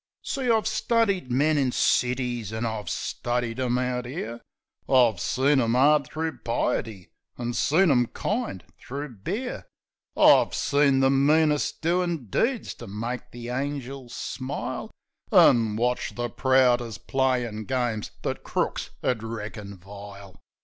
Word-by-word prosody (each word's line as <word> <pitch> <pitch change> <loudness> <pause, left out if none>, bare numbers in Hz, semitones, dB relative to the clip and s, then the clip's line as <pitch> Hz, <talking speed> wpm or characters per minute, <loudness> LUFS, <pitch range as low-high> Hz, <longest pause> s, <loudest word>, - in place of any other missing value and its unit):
"} - - -68
See, 265 -3 -2
I've 220 -2 +3
studied 220 - +1
men 145 +4 +3
in 130 -3 +1
cities, 125 -4 0
an' 110 +1 -3
I've 110 -2 -3
studied 120 0 -2
'em 125 -1 +1
out 125 -1 -2
'ere; 120 -4 -6 0.5
I've 120 -7 +4
seen 135 +7 +2
'em 115 0 +1
'ard 145 +1 +4
thro' 160 0 -4
piety 110 -4 -2 0.3
an' 120 0 -3
seen 165 +7 +3
'em 125 -3 +3
kind 210 - -3 0.2
thro' 140 +3 -6
beer. 190 - -5 0.5
I've - - +6
seen 140 -2 +3
the 135 0 +4
meanest 150 +3 +2
doin' 170 -4 0
deeds 240 0 0
to - - -7
make 115 +5 -5
the 120 0 -8
angels 135 -1 -4
smile, 135 +2 -4 0.4
An' 115 -3 +5
watched 125 +2 -1
the 120 -1 -3
proudest 125 -2 +2
playin' 125 -5 0
games 120 -3 -1
that - - -3
crooks - - -2
'ud 125 -4 0
reckon 105 -3 -6
vile. 100 +1 -11
125 Hz, 135 wpm, -26 LUFS, 115-145 Hz, 0.5 s, I've